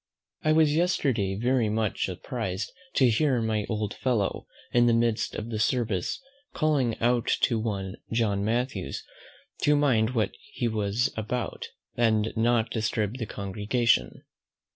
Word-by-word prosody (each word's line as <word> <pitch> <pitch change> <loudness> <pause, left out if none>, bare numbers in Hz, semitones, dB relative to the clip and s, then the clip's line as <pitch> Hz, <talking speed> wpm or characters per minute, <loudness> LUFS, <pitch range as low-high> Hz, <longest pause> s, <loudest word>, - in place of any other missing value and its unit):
I 155 - +3
was 155 -1 +4
yesterday 135 - +1
very 120 +1 +1
much 110 -1 0
surprised 95 0 -4 0.2
to 130 - +5
hear 130 +2 +2
my 110 -2 -1
old 105 -2 -2
friend, 115 -7 0 0.3
in 120 0 +5
the 115 - +4
midst 115 -1 +1
of 110 +2 -5
the 110 - -2
service, 110 - 0 0.4
calling 140 -8 +1
out 120 0 +2
to 115 -4 +2
one 100 -4 -3
John 105 -4 +1
Mathews 110 - -2 0.6
to 150 - +4
mind 125 -5 +2
what 110 -3 +1
he 120 - -3
was 110 +1 0
about, 110 +3 -3 0.3
and 110 -2 +2
not 115 0 +2
disturb 110 +1 -1
the 115 - -3
congregation. 105 +5 0
115 Hz, 140 wpm, -27 LUFS, 105-125 Hz, 0.6 s, to